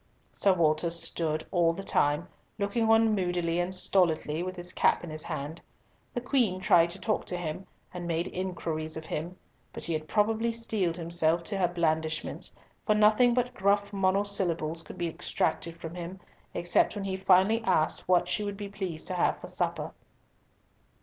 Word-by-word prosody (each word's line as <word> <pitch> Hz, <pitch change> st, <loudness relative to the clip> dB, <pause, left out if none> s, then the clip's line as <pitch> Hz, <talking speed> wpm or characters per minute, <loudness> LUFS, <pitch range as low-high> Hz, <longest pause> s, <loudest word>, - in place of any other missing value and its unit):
Sir 195 Hz, -2 st, +3 dB
Walter 160 Hz, 0 st, +2 dB
stood 165 Hz, -2 st, 0 dB
all 170 Hz, -3 st, +3 dB
the 195 Hz, +3 st, -6 dB
time, 150 Hz, 0 st, +1 dB, 0.3 s
looking 220 Hz, +2 st, 0 dB
on 225 Hz, 0 st, +5 dB
moodily 175 Hz, -3 st, 0 dB
and 175 Hz, +1 st, -1 dB
stolidly, 170 Hz, -4 st, +2 dB
with 185 Hz, +1 st, -4 dB
his 175 Hz, 0 st, -6 dB
cap -, -, +3 dB
in 170 Hz, -, -6 dB
his 155 Hz, 0 st, -6 dB
hand. 155 Hz, +1 st, -5 dB, 0.5 s
The 245 Hz, -, -1 dB
Queen 245 Hz, -8 st, +1 dB
tried 170 Hz, -2 st, +5 dB
to 180 Hz, +3 st, -5 dB
talk 215 Hz, +1 st, 0 dB
to 180 Hz, -, -2 dB
him, 175 Hz, +2 st, -5 dB, 0.3 s
and 175 Hz, -1 st, -5 dB
make 170 Hz, +1 st, -1 dB
inquiries 165 Hz, -4 st, -3 dB
of 160 Hz, -, -7 dB
him, 170 Hz, +5 st, -4 dB, 0.3 s
but -, -, -6 dB
he 170 Hz, -, 0 dB
had 155 Hz, 0 st, -3 dB
probably 225 Hz, +2 st, +1 dB
steeled 210 Hz, -7 st, -1 dB
himself 170 Hz, 0 st, +1 dB
to 200 Hz, +3 st, -2 dB
her 180 Hz, -, +3 dB
blandishments, 160 Hz, -2 st, -1 dB, 0.3 s
for 215 Hz, -, +2 dB
nothing 215 Hz, +3 st, +5 dB
but 250 Hz, 0 st, 0 dB
gruff 200 Hz, -1 st, +1 dB
monosyllables 185 Hz, -4 st, 0 dB
could 165 Hz, -, -11 dB
be 175 Hz, -, -1 dB
extracted 165 Hz, +1 st, -2 dB
from 165 Hz, 0 st, -7 dB
him, 180 Hz, +2 st, -7 dB, 0.4 s
except 175 Hz, +4 st, +2 dB
when 205 Hz, -, -4 dB
he 195 Hz, -1 st, -2 dB
finally 190 Hz, +4 st, +4 dB
asked 155 Hz, -8 st, +1 dB
what 180 Hz, -1 st, +3 dB
she 210 Hz, -, -1 dB
would 205 Hz, -1 st, -4 dB
be 205 Hz, -1 st, -6 dB
pleased 190 Hz, -5 st, -5 dB
to 185 Hz, -, -4 dB
have 180 Hz, -, +1 dB
for -, -, -9 dB
supper. -, -, -2 dB
180 Hz, 175 wpm, -29 LUFS, 165-200 Hz, 0.5 s, on